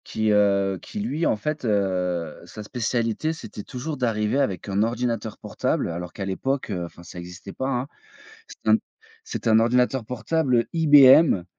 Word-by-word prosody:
Qui, 110 -1 0
heu, 100 -2 +2
qui 210 - -7
lui, 170 -6 -1
en - - +2
fait, 150 +8 -4
heu, 90 -6 -1
sa 105 - -9
spécialité 120 +6 -1
c'était 160 -9 -9
toujours 145 +4 -5
d'arriver 115 0 0
avec 95 -9 -1
un 100 0 0
ordinateur 115 -1 -2
portable - - -2
alors 85 +1 -6
qu'à 100 - -6
l'époque, 130 +6 -2
heu, 90 -3 -3
enfin, 85 0 -13
ça 90 - -10
existait 90 +2 -9
pas, 130 - -3
hein. 125 0 -1 0.6
C'était 110 - -3
un - - +7 0.5
c'était - - -2
un 110 0 +6
ordinateur 125 +1 +2
portable 125 +1 0
IBM, 145 - +6
115 Hz, 165 wpm, -24 LUFS, 100-130 Hz, 0.6 s, un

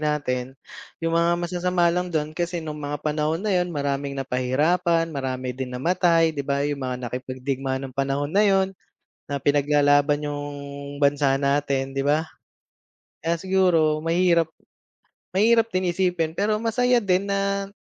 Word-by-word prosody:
natin, 135 -4 -2 0.4
yung 165 -1 -2
mga 170 +1 +3
masasama 175 0 0
lang 180 +1 -1
dun 155 -2 -2
kasi 175 +1 -2
nung 150 -1 -6
mga 145 +1 -5
panahon 150 +1 0
na 210 - +1
yun, 180 -1 +1
maraming 140 -2 -2
napahirapan 155 +7 +1
marami 130 -2 -3
din 130 0 -5
namatay 165 +2 +3
'di 145 - -4
ba. 140 0 -1
Yung 145 -1 -2
mga 130 -1 -3
nakipagdigma 130 +2 -3
ng 130 - -7
panahon 140 +2 -1
na 205 +2 +4
yun 195 -2 +3 0.6
na 140 -2 -3
pinaglalaban 145 0 +3
yung 145 0 -4 0.6
bansa 140 -1 +3
natin 140 -1 0
'di 135 0 -2
ba. 150 +2 +3 1.0
Kaya 165 0 0
siguro 170 -5 +2
mahirap 170 -1 +2 0.8
mahirap 225 +3 +4
din 185 -1 +1
isipin 175 -2 -1
pero 210 +1 +2
masaya 245 +1 +2
din 190 0 +1
na 200 0 0
155 Hz, 145 wpm, -24 LUFS, 140-180 Hz, 1.0 s, na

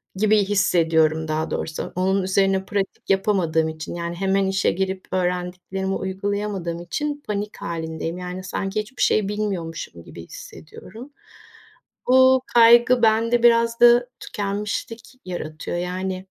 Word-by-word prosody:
gibi 215 +2 +3
hissediyorum 160 -5 +2
daha 155 +1 -2
doğrusu. 160 - -4
Onun 190 +1 +1
üzerine 190 0 +1
pratik 195 -1 -4
yapamadığım 180 -5 +1
için, 155 +1 -7
yani 170 0 -4
hemen 195 +1 +1
işe 195 0 +1
girip 190 +1 -3
öğrendiklerimi 180 +1 -2
uygulayamadığım 190 -3 -3
için 290 - -4
panik 210 0 -4
halindeyim. 165 0 -5
Yani, 180 +1 -6
sanki 195 +2 -3
hiçbir 215 +5 -10
şey 210 -2 +2
bilmiyormuşum 195 -6 -4
gibi - - -11
hissediyorum. 455 - -12 0.9
Bu 260 0 +5
kaygı 240 +1 +6
bende 230 +2 +3
biraz 230 -1 +4
da 240 +1 +6
tükenmişlik 210 +2 -4 0.2
yaratıyor 175 -2 -5
yani 185 +1 -4
195 Hz, 120 wpm, -22 LUFS, 180-215 Hz, 0.9 s, kaygı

